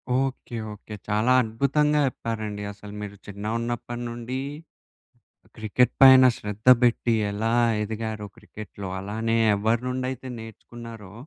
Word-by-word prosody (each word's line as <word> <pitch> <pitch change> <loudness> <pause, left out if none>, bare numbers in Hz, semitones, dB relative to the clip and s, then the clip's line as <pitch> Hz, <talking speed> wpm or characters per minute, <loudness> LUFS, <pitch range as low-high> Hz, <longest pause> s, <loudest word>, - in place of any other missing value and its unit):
Okay, 130 -2 -2 0.2
okay 105 +1 -10
చాలా 110 +4 +2
అద్భుతంగా 140 +6 +1
చెప్పారండి 110 -4 -4
అసలు 105 0 -11
మీరు 100 -1 -7
చిన్నగున్నప్పటి 115 +4 -4
నుండి 120 +2 -5 1.2
క్రికెట్ 110 +3 +1
పైన 130 -1 +10
శ్రద్ధ 105 +2 -7
పెట్టి 120 -1 +2 0.2
ఎలా 110 +3 -1 0.3
ఎదిగారో 110 0 -4
క్రికెట్‌లో. 105 -3 -9
అలానే 110 +3 -1 0.2
ఎవరి 110 +3 +1
నుండి 125 0 -2
అయితే 130 0 -8
నేర్చుకున్నారో 115 -2 -10
115 Hz, 110 wpm, -25 LUFS, 105-120 Hz, 1.2 s, పైన